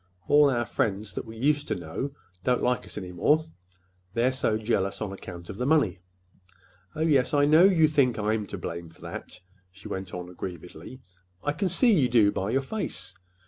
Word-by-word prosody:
All 145 0 +6
our 120 -3 0
friends 105 -2 -2
that - - -5
we 110 0 -10
used 145 +4 +1
to - - -1
know 90 - -4 0.3
don't 125 +2 +1
like 125 0 +1
us - - -7
any 90 -2 -5
more, 150 - +2 0.7
they're 120 +3 +3
so 120 -4 0
jealous 105 -3 -1
on 105 -3 -3
account 85 -3 -9
of 95 - -7
the 125 - -1
money. 140 - +2 1.0
Oh, 155 - -4
yes, 145 -4 +3
I 145 0 +4
know 155 +5 +6
you 170 -5 +5
think 140 -6 +2
I'm 105 0 -1
to 100 - -6
blame 85 -1 -6
for 80 - -21
that," - - -8 0.3
she 100 +2 -12
went 95 0 -5
on 90 0 -6
aggrievedly. 90 - -8 0.4
"I 145 - +1
can 185 +6 -1
see 230 +6 +4
you 140 -10 +3
do, 110 -4 +5
by 95 +1 -2
your 135 +4 +1
face. 200 - -4
115 Hz, 195 wpm, -27 LUFS, 95-145 Hz, 1.0 s, All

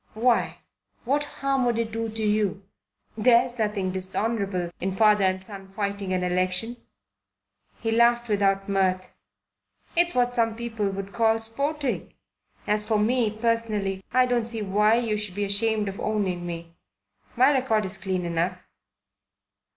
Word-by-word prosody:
Why, 235 +2 +1 0.4
what 285 +4 +1
harm 275 -2 -1
would 235 -1 +1
it 230 -1 -1
do 225 +1 -2
you? 210 -2 0 0.5
There's 240 +2 +3
nothing 210 -3 0
dishonourable 190 -1 -1
in 190 +1 -2
father 210 -1 +4
and 185 0 0
son 195 -1 -10
fighting 200 -2 -3
an 185 -1 0
election." 185 +6 0 1.0
He 225 - -1
laughed 235 +1 +3
without 195 -2 +1
much 190 -2 +2
mirth. 185 - -21 0.8
"It's 345 +1 +2
what 245 0 +2
some 225 -2 +1
people 225 -3 -2
would 195 0 -6
call 225 -1 +3
sporting. 275 +5 -2 0.5
As 210 0 +1
for 215 0 +1
me, 230 +2 +2
personally, 215 -3 -1
I 255 0 +4
don't 245 -2 0
see 225 -2 -1
why 210 +3 +3
you 230 -3 0
should 210 -3 -5
be 205 0 -1
ashamed 210 +1 +1
of 195 0 -5
owning 190 -5 -1
me. 170 -1 -7 0.6
My 260 +3 +5
record 250 -6 +1
is 190 +1 -4
clean 185 -2 -2
enough." 170 +2 -2
210 Hz, 150 wpm, -25 LUFS, 195-230 Hz, 1.0 s, My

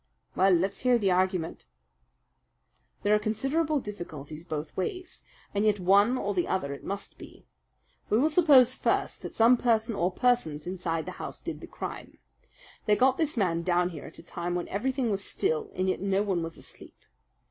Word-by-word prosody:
"Well, 190 +1 +4
let's 185 +3 +1
hear 250 -1 +3
the 200 -4 +1
argument." 180 - 0 1.4
"There 205 - +3
are 210 - +4
considerable 270 +9 0
difficulties 160 - -8
both 155 -2 -5
ways, 365 - -4 0.3
and 200 +1 +1
yet 210 -2 +2
one 200 +7 +4
or 205 -4 -2
the 180 -2 0
other 140 -7 -1
it 140 - -10
must 200 +1 -6
be. - - -13 0.6
We 215 - +3
will 300 +6 +3
suppose 280 -7 +6
first - - -1
that - - -8
some 235 +2 +6
person 230 -1 +1
or 180 -2 0
persons 180 -10 +1
inside 175 -3 -3
the - - -5
house - - -6
did - - -6
the - - -9
crime. - - -7 0.7
They 210 - +5
got 260 +3 +3
this 310 -5 0
man 170 -5 +1
down 175 0 +1
here 160 -5 -9
at - - -13
a - - -12
time 175 +1 -4
when 175 - -2
everything 255 +3 -1
was 200 0 -2
still 160 -4 -1
and 185 +1 0
yet 185 - -1
no 195 +1 +1
one 190 -4 0
was 165 0 -5
asleep. - - -14
200 Hz, 185 wpm, -28 LUFS, 175-240 Hz, 1.4 s, suppose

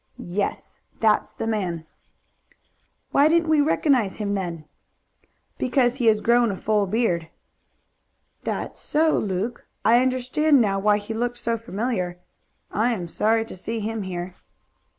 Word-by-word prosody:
"Yes. 200 +1 -3 0.2
That's 215 -1 +2
the - - -5
man." 185 -7 -2 1.3
"Why 285 +2 +5
didn't 330 0 +2
we 310 -2 +5
recognize 275 -8 +2
him 205 -2 -2
then?" 170 -5 -4 0.9
"Because 250 0 +2
he 240 -4 +1
has 215 -1 +4
grown 235 0 +4
a 195 - -2
full 210 -1 +1
beard." 185 -6 0 1.1
"That's - - -4
so, 315 +1 +2
Luke. 200 +4 -3 0.2
I 235 +3 +6
understand 260 +3 +2
now 200 -4 +2
why 205 +1 +3
he 210 +2 -6
looked 245 +2 -2
so 230 -1 -1
familiar. 215 -5 -3 0.5
I 230 +4 +1
am 180 -6 -4
sorry 225 +6 +1
to - - -9
see 225 +5 -4
him 220 +1 -3
here." 180 -1 -5
225 Hz, 140 wpm, -24 LUFS, 195-245 Hz, 1.3 s, I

